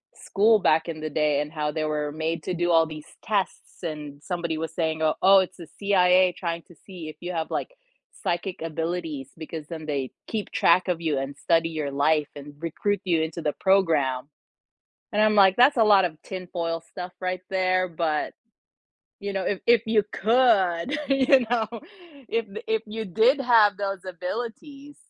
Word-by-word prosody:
school 215 +2 +3
back 160 -1 +2
in 155 - -5
the 155 0 -4
day, 150 -1 +1
and 150 0 -5
how 150 -2 -2
they 155 0 -2
were 150 -1 -2
made 160 +1 -3
to 185 - -3
do 175 0 0
all 165 -1 +5
these 155 -1 -9 0.2
tests, 200 -2 -3
and 150 -3 -6
somebody 170 -3 -3
was 160 0 -4
saying, 160 -2 -1
"O 155 -1 +3
oh, 195 +1 +7
it's 185 0 -2
the 170 -3 -10
CIA 185 -2 +4
trying 170 -2 -4
to 175 - -19
see 180 -5 -9
if 155 - -8
you 175 +1 -4
have 160 -2 -2
like - - -3 0.5
psychic 180 0 -2
abilities, 160 -3 -4
because 160 -1 -7
then 160 -2 -7
they 140 -4 -3 0.2
keep 215 -2 -4
track 175 +2 +3
of 175 -2 0
you 155 -4 0
and 135 +1 -5
study 165 +1 +2
your 155 -3 -3
life, 150 +2 +2
and 145 0 -10
recruit 185 +4 -2
you 170 -3 +2
into 160 +1 -3
the 150 -2 -1
program." 155 -10 +2 0.9
And 210 - +2
I'm, 215 0 +4
like, 190 -2 +6
"That's 255 +3 +5
a 225 - +5
lot 200 -3 +6
of 155 -3 -4
tin 185 -2 -7
foil 165 -2 -2
stuff 180 0 -7
right 185 0 -2
there", 185 -1 +1
but 160 -3 -2 0.9
you 200 0 -4
know, 195 -1 -2
if 195 0 -1
if 235 -1 +6
you 220 -1 +3
could, 225 - +2
you 270 -1 +5
know, 230 -2 +1 0.6
if 230 0 0
y - - -7
if 445 0 +1
you 220 +1 -5
did 230 - +3
have 225 -6 +5
those 195 -2 -3
abilities, 240 - -6
175 Hz, 190 wpm, -25 LUFS, 160-200 Hz, 0.9 s, oh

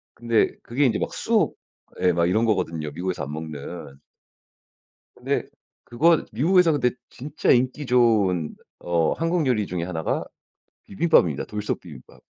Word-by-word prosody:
근데 115 -2 +1
그게 130 +5 0
인제 120 - +1
막 - - -3
쑥 - - +1 0.4
예 90 0 +4
막 85 0 +1
이런 110 +6 +2
거거든요 85 -8 -1
미국에서 90 +3 -3
안 70 - -7
먹는. 75 -2 -8 1.2
근데 - - -2 0.4
그거 160 +7 +3
미국에서 165 - +4
근데 135 -4 +2 0.2
진짜 145 +4 -2
인기 130 +3 +2
좋은 105 -10 +2 0.2
어 85 -2 0
한국 165 -1 0
요리 110 -6 +1
중에 90 -2 -3
1가 80 -3 -2 0.6
비빔밥입니다 95 - +2
돌솥비빔밥. 90 -9 -7
105 Hz, 280 characters per minute, -24 LUFS, 85-125 Hz, 1.2 s, 예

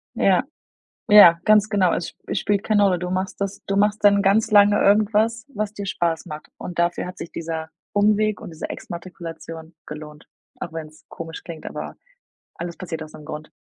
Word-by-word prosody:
Ja, - - +3 0.7
ja, 175 -5 +9
ganz 215 -1 +5
genau. 195 -5 +2
Es 170 - -3
es - - -1
spielt 205 -1 0
keine 210 -2 +3
Rolle. 185 -3 +3
Du 180 +1 -4
machst 185 +1 -3
das 200 0 -3
du 195 - -1
machst 210 +1 +2
dann 200 -1 +6
ganz 210 +3 +2
lange 205 0 +6
irgendwas, 215 +3 +2
was 210 0 -3
dir 205 -1 -6
Spaß 170 -4 -1
macht 150 0 -8
und 180 - -7
dafür 170 0 0
hat 180 - -9
sich 170 - -8
dieser 160 -1 -5 0.2
Umweg 210 +1 +2
und - - -9
diese 160 - -6
Exmatrikulation 165 -2 -8
gelohnt. 150 0 -10 0.3
Auch 160 - -6
wenn's 155 -1 -9
komisch 165 0 -8
klingt, 165 -2 -9
aber - - -6 0.6
alles 170 0 -6
passiert 165 -3 -6
aus 155 0 -10
'nem 150 - -11
Grund. 150 0 -8
185 Hz, 185 wpm, -22 LUFS, 165-205 Hz, 0.7 s, ja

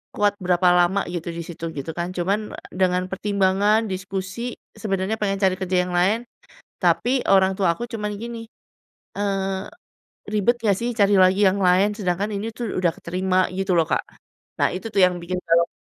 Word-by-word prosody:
kuat 205 -1 +2
berapa 180 0 +2
lama 185 +3 +3
gitu 175 -2 -5
di - - -5
situ, 165 -1 -6
gitu 140 +2 -4
kan, 175 +1 -3
cuman 200 +4 -1 0.2
dengan 180 0 +1
pertimbangan, 200 +2 +2
diskusi, 195 +5 -4 0.2
sebenarnya 200 -1 -1
pengen 195 -2 -1
cari 185 -1 +3
kerja 185 -1 0
yang - - -5
lain. 205 +7 +2 0.6
Tapi 255 +1 +2
orang 190 -1 +4
tua 185 -4 +2
aku, 240 - -6
cuman 210 -3 -4
gini, 230 0 -6 0.8
eee, 195 -1 -1 0.7
"Ribet 215 +3 +2
gak 200 -3 +3
sih 240 +1 -1
cari 200 -1 +4
lagi 185 +2 +4
yang 200 +1 -1
lain? 185 +3 +4
Sedangkan 190 0 -1
ini 215 +3 -3
tuh 235 -3 -4
udah 175 -2 +2
kerima." 185 +1 0
Gitu 190 -1 0
loh 165 - +4
Kak. - - +1 0.6
Nah, - - +4
itu 190 +5 -5
tuh 200 - +2
yang 180 -1 +2
bikin 180 +2 -4
gawat. 170 0 +3
190 Hz, 175 wpm, -23 LUFS, 180-205 Hz, 0.8 s, orang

